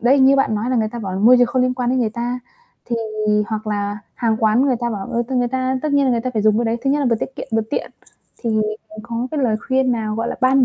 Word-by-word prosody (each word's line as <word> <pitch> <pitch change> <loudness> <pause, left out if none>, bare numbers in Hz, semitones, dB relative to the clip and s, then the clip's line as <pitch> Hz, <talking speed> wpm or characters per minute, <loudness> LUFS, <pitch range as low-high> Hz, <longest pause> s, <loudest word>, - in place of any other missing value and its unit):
đấy, 260 +4 +4
như 270 +1 +6
bạn 270 -5 +2
nói 220 +4 -1
là 255 - +1
người 220 -1 +1
ta 240 - -7
bảo 195 -4 -4
là 190 - -3
môi 235 +5 +7
trường 245 -1 +5
không 250 +1 +1
liên 255 0 +1
quan 250 -1 -1
đến 260 - +1
người 230 -3 +1
ta, 240 +2 -3 0.5
thì 235 - -2 0.5
hoặc 215 -1 -4
là 205 -1 -2 0.2
hàng 225 -2 0
quán 220 +2 +3
người 270 -3 +2
ta 240 0 -1
bảo, 200 -3 -4
ừ, 235 - -1
thì 265 - -1
người 245 -1 +1
ta 260 +1 -1
tất 305 -1 -1
nhiên 285 -1 +4
là 260 - +2
người 235 -2 +1
ta 255 - -3
phải 215 -3 0
dùng 215 0 +4
cái 240 - +1
đấy, 225 0 0
thứ 270 - +2
nhất 290 - +2
là 280 - +1
vừa 230 - +3
tiết 265 +4 -6
kiệm - - -6
vừa 225 0 +2
tiện. - - -2 0.5
Thì 235 - -1 0.4
bạn 215 - -12
có 235 +1 -3
cái 305 - -2
lời 230 -5 +2
khuyên 260 -1 +2
nào, 220 -2 -2
gọi 230 +1 -2
là, - - -3
ban 260 +1 +5
240 Hz, 315 wpm, -20 LUFS, 220-260 Hz, 0.5 s, môi